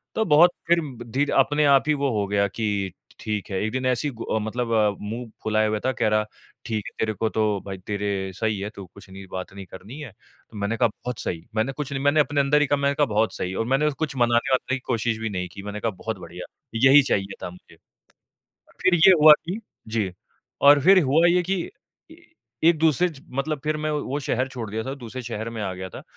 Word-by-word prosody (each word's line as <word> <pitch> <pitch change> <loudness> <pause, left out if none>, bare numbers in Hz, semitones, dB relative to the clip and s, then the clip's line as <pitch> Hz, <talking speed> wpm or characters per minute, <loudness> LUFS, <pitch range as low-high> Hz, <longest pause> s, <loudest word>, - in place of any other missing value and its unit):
तो 220 - +2
बहुत 165 +1 +6 0.2
फ़िर 170 0 +4 0.3
धीरे 135 +5 -1
अपने 145 +3 +3
आप 140 -1 +5
ही 150 - +4
वो 140 -1 0
हो 100 - -1
गया 100 0 +1
कि 100 -2 -2 0.3
ठीक 105 -2 -4
है 95 - -1
एक 110 - -1
दिन 130 0 -2
ऐसे 130 +3 +1
ही 140 - -4
गु 115 -1 -3
मतलब 115 +2 -3
अ, 110 -2 +4
मुँह 115 +3 -5
फुलाए 110 0 +2
हुआ 105 0 -1
था 130 - +2
कह 110 - 0
रहा 110 0 +2 0.4
ठीक 110 -2 -3
है - - -7
तेरे 110 -1 0
को 110 +3 -1
तो 110 - -1 0.2
भाई 95 -1 -6
तेरे 100 -2 -2
सही 110 -1 -1
है 100 - -4
तू 100 - -8
कुछ 100 +2 -16
नहीं 95 +1 -10
बात 95 +1 -6
नहीं 100 -1 -9
करनी 105 +10 -11
है 145 -6 -8
तो 105 - -19
मैंने 100 +3 -2
कहा - - +4
बहुत 125 +3 -7
सही। 85 -7 -4
मैंने 110 +5 +1
कुछ 145 0 -5
नहीं 135 - -2
मैंने 145 +2 +3
अपने 145 -1 +2
अंदर 145 +2 +3
ही 150 - +2
कहा 145 - +2
मैंने 140 0 +1
कहा 145 - +3
बहुत 110 -2 0
सही 90 - -3
और 115 - -1
मैंने 135 +4 +2
कुछ 145 -1 -4
मनाने-वनाने 125 +2 +1
की 135 - -5
कोशिश 115 0 -1
भी 110 -1 -3
नहीं 90 -2 -3
की 100 - -10
मैंने 105 +1 -5
कहा 115 - -1
बहुत 110 +2 -5
बढिया, 90 - -9 0.3
यही 135 +5 +7
चाहिए 100 -6 -1
था - - -3
मुझे। 90 +1 -16 1.1
फ़िर 185 - +4
ये 175 +3 +7
हुआ 155 0 +11
कि 185 +5 -3 0.3
जी 110 -5 -1 0.5
और 145 0 +7
फ़िर 190 +1 +7
हुआ 155 +5 +4
ये 180 +1 +3
कि 190 +3 -1 0.6
ई 320 - -13 0.5
एक-दूसरे 160 +1 +3
ज 145 -5 -12 0.2
मतलब 155 0 -3
फ़िर 155 0 0
मैं 155 0 -2
वो 145 -1 -2
शहर 130 -1 -1
छोड़ 115 -5 -6
दिया 110 +1 -3
था 135 - -4
दूसरे 130 -1 -8
शहर 115 -1 -5
में 110 -2 -5
आ 95 - -2
गया 95 0 -6
था - - -10
120 Hz, 235 wpm, -24 LUFS, 105-145 Hz, 1.1 s, हुआ